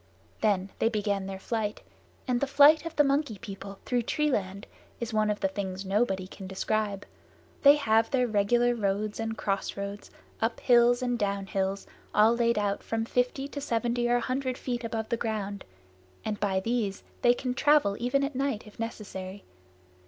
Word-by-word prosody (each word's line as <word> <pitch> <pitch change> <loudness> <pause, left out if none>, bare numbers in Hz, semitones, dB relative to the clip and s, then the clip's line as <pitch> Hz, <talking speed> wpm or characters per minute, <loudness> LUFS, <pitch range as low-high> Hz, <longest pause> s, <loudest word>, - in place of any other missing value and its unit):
Then 195 -3 +1
they 225 - +3
began 205 -3 -1
their 195 0 -5
flight; 215 +1 -3 0.5
and 245 -1 +1
the 280 - +1
flight 290 +3 +6
of 330 - -8
the 295 - +5
Monkey 275 -5 0
People 195 -2 -8
through 245 -1 +1
tree 300 +5 0
land 195 -3 -2 0.3
is 235 -1 -4
one 215 0 +2
of 210 - -2
the - - +3
things 190 -1 -4
nobody 195 -1 +1
can 190 0 -9
describe. 200 +1 -2 0.6
They 285 0 +8
have 225 -5 +2
their 250 -2 +2
regular 240 +3 +2
roads 210 -1 -1
and 225 0 -3
crossroads, 200 +1 -3 0.3
up 225 +1 0
hills 245 0 +4
and 245 -1 0
down 200 -1 -1
hills, 195 0 -2 0.3
all 220 +2 +5
laid 235 -1 +2
out 205 -1 0
from 225 0 -2
fifty 250 +3 0
to 285 - -6
seventy 240 -1 0
or 240 - +4
a 245 - +1
hundred 255 0 -2
feet 245 -2 -3
above 225 -1 -3
ground, 215 -4 -3 0.6
and 210 -1 -2
by 190 -2 +1
these 220 -3 -1 0.2
they 240 0 +5
can 250 0 -2
travel 280 -6 +3
even 250 +4 +1
at 280 +1 -2
night 265 -4 -2
if 210 - -15
necessary. 200 -4 -6
225 Hz, 175 wpm, -28 LUFS, 200-245 Hz, 0.6 s, They